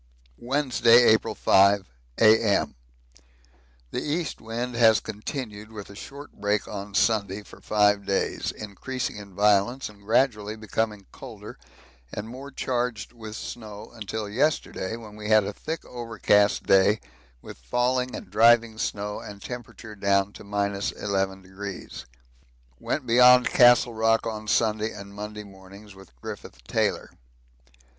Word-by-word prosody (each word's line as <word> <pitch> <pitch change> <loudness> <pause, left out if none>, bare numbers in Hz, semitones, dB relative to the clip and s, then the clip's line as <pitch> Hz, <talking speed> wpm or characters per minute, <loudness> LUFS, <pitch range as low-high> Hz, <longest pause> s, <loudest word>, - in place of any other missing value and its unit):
Wednesday, 125 -2 +4
April 110 -2 +3
5, 100 0 +4 0.3
A.M. 110 -1 +4 1.2
The - - -2
east 155 +2 -3
wind 120 +3 -4
has 115 -2 +5
continued 110 -1 -6
with 105 -2 -9
a - - -12
short 140 +7 -10
break 105 0 -1
on 100 -1 -7
Sunday 105 -2 +1
for - - -15
five 105 -1 +2
days, 95 - -1
increasing 110 +4 -5
in 100 -3 -11
violence 105 +6 +2
and 105 -1 -17
gradually 110 -1 +1
becoming 110 -1 -3
colder - - -10 0.6
and 105 +1 -5
more 130 +4 -9
charged 125 -4 -3
with 110 -2 -9
snow 105 -3 -8
until 110 -1 -5
yesterday, 115 -3 -1
when 110 -2 -11
we 105 0 -6
had 110 -1 +6
a 100 +1 -4
thick 160 +9 -6
overcast 110 -4 +1
day 95 +2 +4 0.4
with - - -11
falling 125 - 0
and 90 - -9
driving 115 +1 +4
snow 105 -1 -3
and 100 -1 -10
temperature 120 -3 -8
down 100 0 +1
to - - -11
11°. 100 -1 -3 0.7
Went 140 - -3
beyond 125 +1 +6
Castle 120 -1 +6
Rock 115 0 +2
on 110 -1 -5
Sunday 110 0 +1
and 100 -1 -10
Monday 105 +1 -7
mornings 100 +1 -14
with 95 -9 -17
Griffith - - -9
Taylor. - - -1
105 Hz, 130 wpm, -25 LUFS, 100-120 Hz, 1.2 s, had